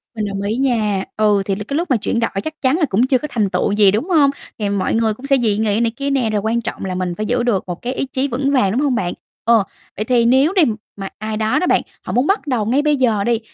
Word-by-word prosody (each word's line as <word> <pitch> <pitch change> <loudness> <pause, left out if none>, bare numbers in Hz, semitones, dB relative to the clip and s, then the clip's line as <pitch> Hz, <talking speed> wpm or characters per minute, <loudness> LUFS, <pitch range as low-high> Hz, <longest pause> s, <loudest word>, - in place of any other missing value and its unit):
Mình 215 -2 -2
đồng 200 -1 -4
ý 205 +2 -1
nha, 215 -7 +1
ừ, 210 -2 +3
thì 195 - -1
l 205 - -7
cái 285 - -2
lúc 340 -4 -2
mà 250 - +4
chuyển 225 +2 -1
đổi 230 - 0
chắc 315 0 -7
chắn 270 +4 +2
là 320 - +2
cũng 235 +2 +1
chưa 260 -1 +3
có 300 - -5
thành 210 -4 0
tựu 180 +2 0
gì, 205 -2 +5
đúng 230 - -2
hông? 300 -5 +5 0.3
Thì 205 - -1
mọi 200 -2 -1
người 225 -1 +1
cũng 255 +5 -11
sẽ 275 -1 +3
dị 220 -5 +1
nghị 215 -1 +1
này 230 -1 +1
kia 280 0 -2
nè, 260 -5 +1
rồi 210 -2 0
quan 225 +2 0
trọng 230 -3 -5
là 185 -1 -3
mình 180 -1 -2
phải 215 - -3
giữ 245 +2 0
được 225 -6 +1
một 175 -1 -6
cái 250 +2 -3
ý 270 - -2
chí 265 +1 -2
vững 270 +2 -1
vàng, 250 -9 +2
đúng 245 +7 0
hông 275 -4 +1
bạn? 175 -5 -1 0.3
Ờ, 230 -3 +4 0.3
vậy 215 - -3
thì 240 -1 +2
nếu 265 +9 +4
đi, 375 - +4 0.3
mà 195 -1 -6
ai 215 0 -4
đó 220 +7 +1
đó 365 - 0
bạn, - - +3 0.2
họ - - -6
muốn 250 +4 +2
bắt 395 -5 0
đầu 245 -6 0
ngay 255 +7 +2
bây 300 -1 +2
giờ 225 -6 +2
đi, 235 0 +1
230 Hz, 300 wpm, -18 LUFS, 210-270 Hz, 0.3 s, gì